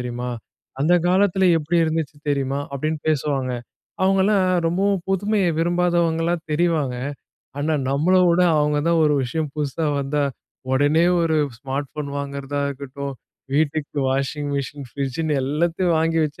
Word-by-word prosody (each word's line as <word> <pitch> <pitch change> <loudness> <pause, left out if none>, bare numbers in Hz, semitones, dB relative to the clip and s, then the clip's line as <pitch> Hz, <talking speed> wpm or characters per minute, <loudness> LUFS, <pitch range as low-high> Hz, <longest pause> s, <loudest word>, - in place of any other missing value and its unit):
தெரியுமா? 125 0 -4 0.5
அந்த 170 +4 +4
காலத்துல 190 0 +3
எப்பிடி 160 +3 0
இருந்துச்சு 160 -2 -2
தெரியுமா? 140 0 -1
அப்பிடின்னு 155 +2 -3
பேசுவாங்க. 140 -4 0 0.5
அவுங்கலாம் 195 0 +3 0.2
ரொம்பவும் 190 +2 +1
புதுமைய 200 +1 +1
விரும்பாதவங்களா 170 -1 +1 0.2
தெரிவாங்க. 155 -5 +1 0.6
ஆனா, 150 +2 0 0.2
நம்மள 155 +7 +2
விட 170 +1 +4 0.2
அவுங்க 150 0 +2
தான் 170 -1 +3
ஒரு 150 -1 +3
விஷயம் 150 +4 -2
புதுசா 150 +1 -2
வந்தா 145 +1 0 0.5
உடனே 145 +4 +3 0.2
ஒரு 165 -1 +1 0.2
ஸ்மார்ட் 135 +1 -3
ஃபோன் 150 -1 -5
வாங்குறதா 140 0 -4
இருக்கட்டும், 140 0 -6 0.4
வீட்டுக்கு 150 0 0
வாஷிங் 140 +2 -1
மிஷின், 140 0 -5
ஃப்ரிட்ஜ்ஜின்னு 140 +4 -2
எல்லாத்தையும் 165 +6 0
வாங்கி 165 +1 +1
வச்சு 150 -1 -6
150 Hz, 130 wpm, -22 LUFS, 140-170 Hz, 0.6 s, அந்த